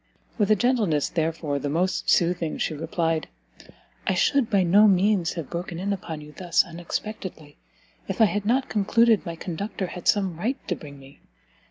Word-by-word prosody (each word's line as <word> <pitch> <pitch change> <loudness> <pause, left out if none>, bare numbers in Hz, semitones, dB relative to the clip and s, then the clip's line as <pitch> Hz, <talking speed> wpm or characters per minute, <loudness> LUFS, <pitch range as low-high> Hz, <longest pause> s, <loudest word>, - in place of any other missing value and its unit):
With 205 -1 +2
a 215 - +6
gentleness, 210 - +1
therefore, 160 -3 -1
the 145 - -3
most 180 +5 0
soothing, 170 -2 +2
she - - -1
replied, 165 +1 -1 0.8
"I 190 - +2
should 235 - +2
by 200 -4 +3
no 200 +5 +6
means 195 -2 +2
have 165 -5 -6
broken 170 0 -4
in 200 +3 -1
upon 165 -5 -6
you 150 0 -11
thus 175 -2 +2
unexpectedly, 170 -2 -6 0.5
if - - -4
I 220 - +7
had 205 0 -1
not 255 +5 +1
concluded 220 +2 +3
my 170 - -4
conductor 190 +4 -4
had 180 0 -7
some 190 -5 +2
right 245 +8 -1
to - - +1
bring 145 -2 -11
me. 135 0 -16
180 Hz, 175 wpm, -25 LUFS, 165-205 Hz, 0.8 s, I